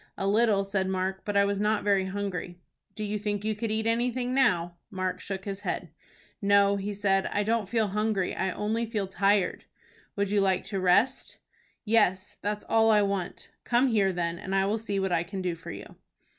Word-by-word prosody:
"A 195 - -2
little," 210 -1 +3
said 195 -1 -1
Mark, 190 0 -2
"but 205 -1 0
I 200 - +5
was 200 0 -1
not 210 0 +1
very 200 -2 +2
hungry." 190 -2 -4 0.4
"Do 215 - -4
you 210 0 -2
think 205 0 -2
you 220 - +1
could 220 +2 -3
eat 220 +1 -1
anything 245 +2 0
now?" 175 -10 +2
Mark 185 -1 -3
shook 190 -1 -6
his 200 -1 -4
head. 180 -4 -4 0.5
"No," 200 0 +4
he 200 +1 -3
said, 195 -1 +1
"I 205 - +1
don't 220 -2 0
feel 225 -2 +1
hungry. 210 -2 0
I 190 - -1
only 220 +5 -2
feel 215 -3 -2
tired." 195 0 +1 0.5
"Would 200 -1 -1
you 205 -1 +3
like 190 -2 +1
to 195 0 -4
rest?" 190 +8 +2 0.5
"Yes. 205 -4 +1
That's 210 0 -2
all 225 0 +4
I 210 -1 +5
want." 195 -3 -3
"Come 250 +2 +2
here 200 -4 +2
then, 170 -1 -2
and 190 - -3
I 195 0 +3
will 210 +3 0
see 205 -3 -2
what 190 -1 -1
I 165 - +2
can 190 +3 -6
do 180 -2 -1
for 165 0 -10
you." - - -9
200 Hz, 205 wpm, -28 LUFS, 190-215 Hz, 0.5 s, I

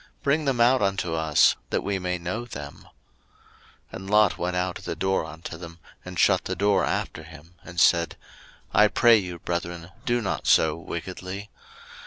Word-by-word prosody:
bring 150 +2 +1
them 135 -3 0
out 125 +1 +4
unto 95 -4 0
us, 80 -2 +4
that - - -1
we 100 -1 -1
may 90 0 -2
know 90 +7 -4
them. 75 -11 -9 1.1
01:019:006 - - -5
And 95 +1 -8
Lot 105 -1 +4
went 90 +1 -2
out 90 0 -2
at - - -14
the - - -3
door 95 -3 0
unto 80 +1 -8
them, 85 -1 -10 0.3
and - - -8
shut - - +3
the - - -2
door 100 -1 +2
after - - -2
him, 80 +1 -14
01:019:007 - - -13
And 85 -1 -5
said, 85 -1 +3 0.6
I 105 - +6
pray 115 +2 +5
you, 90 -4 -4
brethren, 85 0 -4 0.2
do 120 0 +2
not 110 - -3
so 80 -1 +4
wickedly. 95 +4 -7
90 Hz, 185 wpm, -25 LUFS, 85-105 Hz, 1.1 s, I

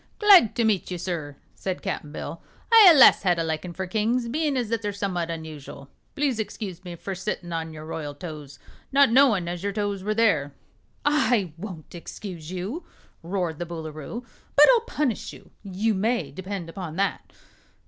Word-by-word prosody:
"Glad 395 - +7
to 235 - +1
meet 215 -4 +1
you, 180 - -3
sir," 165 -5 -4 0.2
said 185 -1 -5
Cap'n 150 - -4
Bill. - - -7 0.3
"I 450 -2 +9
allus 295 -6 +8
had 180 -3 +2
a 165 - 0
likin' 160 +2 -3
for 190 +2 -4
kings, 225 +5 0
bein' 295 +1 0
as 240 -4 -1
they're 220 -2 -1
summat 190 -4 -3
unusual. 155 -4 -8 0.2
Please 280 -5 0
'scuse 195 -4 -5
me 175 -2 -7
for 195 - -7
a - - -3
sittin' 180 -2 -4
on 165 0 -3
your 155 0 -9
royal 150 -2 -5
toes, 150 -4 -9 0.3
not 275 -3 +5
knowin' 230 -9 +4
as 175 0 -4
your 200 +1 -1
toes 205 -2 -2
were 215 +1 -1
there." 155 -11 +2 0.5
"I 250 - +2
won't 170 -3 -9
excuse 170 -1 -8
you!" 195 - -4 0.4
roared 175 -3 -3
the 175 - -3
Boolooroo. 160 - -7 0.3
"But - - +9
I'll 465 -2 +3
punish 265 -7 -2
you. - - -15
You 205 +3 -1
may 225 +5 0
depend 190 -2 -6
upon 165 -1 -7
that." 200 +2 -2
190 Hz, 180 wpm, -25 LUFS, 165-225 Hz, 0.5 s, I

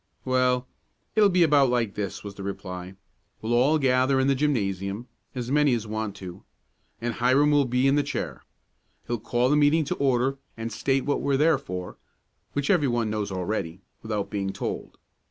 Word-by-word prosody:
"Well, 125 -1 +2 0.5
it'll 210 -2 +6
be 180 -2 +4
about 145 -4 +4
like 120 -4 0
this," 100 -2 -4
was 100 -1 -7
the 100 - -10
reply. 95 -1 -6 0.5
"We 110 - -2
will 120 - +4
all 145 +5 +4
gather 130 -1 +3
in 130 - +2
the 140 - +3
gymnasium 105 -6 -1 0.3
as 125 0 -4
many 145 -3 +4
as 115 -2 -4
want 110 -1 -3
to 90 0 -9 0.6
and 120 0 -2
Hiram 130 +6 +3
will 145 -1 +4
be 125 +2 +2
in 135 - +4
the 145 - +3
chair. - - -4 0.6
He'll 120 -1 -2
call 120 +3 +1
the 145 - +4
meeting 150 +2 +4
to - - -2
order 135 0 +1 0.2
and 115 0 -4
state 135 +3 0
what 145 - 0
we're 140 -1 +1
there 155 0 +4
for, 90 -8 -6 0.6
which 145 +3 0
everyone 120 - +1
knows 105 -2 -2
already, 95 -2 -3 0.2
without 105 -3 -3
being 100 -2 -2
told. - - -5
125 Hz, 185 wpm, -26 LUFS, 105-140 Hz, 0.6 s, it'll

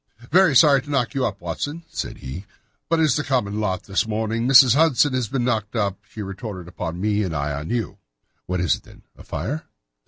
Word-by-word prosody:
"Very 180 -6 +5
sorry 140 0 +6
to 145 - -14
knock 135 -4 0
you 135 -2 +1
up, 100 -4 -7
Watson," 145 - -4
said - - -5
he, 75 +10 -8 0.4
"but 165 0 +2
it's 155 -4 +3
the 150 - -1
common 110 -7 -1
lot 95 -4 -1
this 100 +2 -1
morning. 110 +2 -1
Mrs. 130 -2 +8
Hudson 145 -2 +3
has 125 -3 0
been 125 +2 -1
knocked 110 -3 -1
up, 100 -3 -1
she 105 - -7
retorted 95 -2 -7
upon 85 0 -5
me, 105 +1 +1
and 90 -5 -2
I 70 0 -1
on 75 +2 -5
you." 115 -5 -3 0.5
"What 90 -1 -1
is 90 - +3
it, - - -18
then—a - - -18
fire?" 150 +3 -4
110 Hz, 210 wpm, -22 LUFS, 95-135 Hz, 0.5 s, Mrs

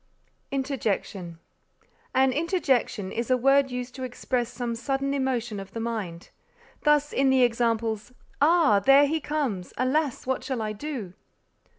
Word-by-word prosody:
INTERJECTION 215 - -2 0.8
An 265 0 +4
interjection 275 - 0
is 235 +2 -3
a 255 - +4
word 275 +2 +4
used 250 0 -5
to 260 - -9
express 245 -1 -2
some 240 -2 -3
sudden 270 +3 -1
emotion 245 -6 -1
of 195 0 -9
the 230 - -4
mind. 215 -7 -4 0.5
Thus 295 -1 +3
in 270 0 +3
the 260 -1 +4
examples, 230 -2 0 0.3
"Ah! 310 -8 +5
there 275 +7 +6
he 315 +3 0
comes; 275 -12 -3
alas! 270 +2 0
what 260 -1 -1
shall 260 -4 -2
I 215 0 -2
do?" 225 -6 -6
255 Hz, 145 wpm, -26 LUFS, 225-275 Hz, 0.8 s, there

